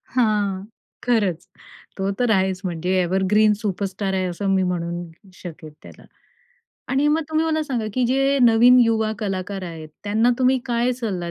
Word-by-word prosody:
हां, 205 -5 +1 0.4
खरंच. 205 -9 0 0.5
तो 195 0 -1
तर 245 -1 +1
आहेच, 190 -2 +1
म्हणजे 175 0 -2
एवरग्रीन 190 +4 +2
सुपरस्टार 195 -1 -3
आहे, 190 -1 0
असं 190 +3 -3
मी 190 - +2
म्हणू 175 -1 -3 0.2
शकेल 165 -4 -10
त्याला. - - -14 0.8
आणि 270 +3 +2
मग 310 +2 +2
तुम्ही 315 +1 +1
मला 315 -1 0
सांगा 250 -7 -3
की 255 - +1
जे 270 +2 +2
नवीन 240 +2 +6
युवा 220 -2 +2
कलाकार 195 -1 -4
आहेत 165 -3 -8 0.2
त्यांना 220 +4 +2
तुम्ही 260 0 +3
काय 240 0 +1
सल्ला 200 -9 -4
205 Hz, 155 wpm, -22 LUFS, 185-245 Hz, 0.8 s, नवीन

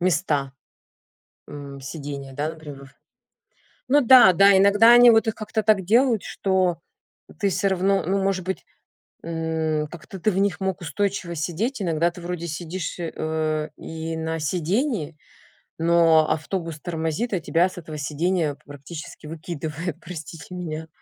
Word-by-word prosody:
места, 150 -6 0 1.0
м, 140 -1 -9
сидения, 140 -1 -7
да, 145 +3 -2
например. 145 -4 -11 0.9
Ну 290 +3 +4
да, 245 -6 +8
да. 195 +2 +6
Иногда 205 +4 +6
они 240 0 +8
вот 225 0 +3
их 220 - 0
как-то 215 0 -2
так 205 -2 +3
делают, 230 +1 +3
что 185 -3 0 0.6
ты 200 -2 +2
всё-равно, 195 +1 +1
ну 195 +2 0
может 190 -2 0
быть, 190 - -4 0.6
м, 160 -2 -2
как 165 0 -12
то 190 - -8
ты 215 - +2
в 185 - -1
них 200 0 0
мог 190 0 -2
устойчиво 175 +2 -2
сидеть. 205 - -2
Иногда 170 0 +1
ты 175 - -12
вроде 170 -1 -5
сидишь, 170 +2 -5
э, 155 -2 -2
и 160 0 -6
на 160 0 -3
сидении, 180 - -1 0.7
но 165 -2 +4
автобус 165 0 -3
тормозит, 170 +6 -3
а 180 - 0
тебя 170 +3 +2
с 185 - -11
этого 155 -2 -8
сидения 155 +1 -1
практически 145 +3 -10
выкидывает, 160 +1 -5
простите 165 +1 -9
меня. 160 -3 -5
170 Hz, 145 wpm, -23 LUFS, 155-195 Hz, 1.0 s, да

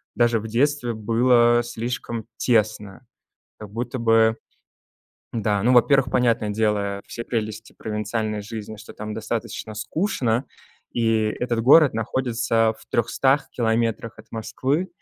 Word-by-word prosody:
даже 120 -2 +3
в 110 - -7
детстве 125 +1 0
было 120 +2 +3
слишком 120 -1 -4
тесно. 110 -1 0 0.5
Как 105 -1 -10
будто 120 +3 -4
бы, 115 -1 +4 1.0
да, 105 -3 0
ну, 125 +3 +3
во-первых, 125 +1 +4
понятное 115 -4 +1
дело 105 -2 0
все 115 - -6
прелести 110 -1 -4
провинциальной 105 0 -3
жизни, 110 0 -7
что 110 - -12
там 105 0 -6
достаточно 110 0 -4
скучно, 125 - -1 0.5
и 115 -2 +2 0.2
этот 120 -2 0
город 145 +4 +6
находится 115 -1 0
в - - -18
300 135 +4 +1
километрах 115 -1 -1
от 110 - -20
Москвы, 135 +9 -2
115 Hz, 125 wpm, -23 LUFS, 110-120 Hz, 1.0 s, город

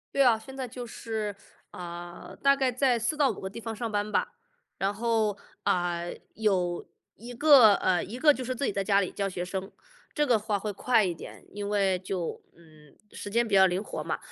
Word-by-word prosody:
对 275 - +5
啊， 230 -3 +4
现 265 +4 -11
在 260 -1 -3
就 245 0 -7
是， 220 -3 -4 0.4
呃， 175 0 -8
大 275 0 +5
概 265 -2 +1
在 250 -1 +2
4-5 260 0 0
个 190 - -4
地 220 - -8
方 225 -1 -5
上 230 0 -4
班 210 0 -2
吧。 - - +1 0.5
然 195 +1 0
后， 220 -2 0 0.3
啊， 175 -1 0 0.3
有 185 -5 0 0.3
一 240 +3 -10
个 245 -6 +7
呃， 180 -2 +1
一 225 +6 -6
个 295 +2 +6
就 260 - -6
是 255 0 -3
自 280 - -4
己 - - +1
在 195 - -1
家 200 0 +3
里 185 - -2
教 200 -1 -2
学 180 -2 -4
生， 190 +2 -4 0.4
这 295 -1 +2
个 235 -5 +3
话 210 -1 -1
会 210 +1 -3
快 225 +2 +2
一 180 -2 0
点。 - - -11
因 205 0 -5
为 195 -3 +1
就 185 -2 -4
嗯， 155 -3 -19 0.2
时 205 - -7
间 235 +3 +2
比 210 - -5
较 190 -1 +7
灵 185 +3 0
活 - - -5
嘛。 - - -1
210 Hz, 220 characters per minute, -28 LUFS, 190-240 Hz, 0.5 s, 个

